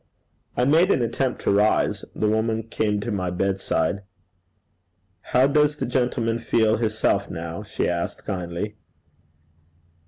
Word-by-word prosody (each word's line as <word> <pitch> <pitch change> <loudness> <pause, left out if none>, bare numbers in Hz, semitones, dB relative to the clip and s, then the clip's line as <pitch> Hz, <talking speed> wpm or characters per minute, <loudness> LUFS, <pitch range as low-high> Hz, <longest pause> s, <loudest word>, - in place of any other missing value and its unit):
I 125 - +3
made 160 +7 +4
an 130 - +3
attempt 125 +3 -1
to - - +1
rise. 105 +2 +2
The 110 - 0
woman 110 +1 +1
came 105 -2 -1
to 115 - -3
my 95 -3 -1
bedside. 95 0 0 1.2
'How 125 +7 +3
does 150 +1 +3
the - - -3
gentleman 120 -2 0
feel 110 -1 +2
hisself 110 -3 0
now?' 85 +2 -5
she 105 - -2
asked 85 -1 -3
kindly. 95 +2 -4
110 Hz, 130 wpm, -24 LUFS, 100-120 Hz, 1.2 s, made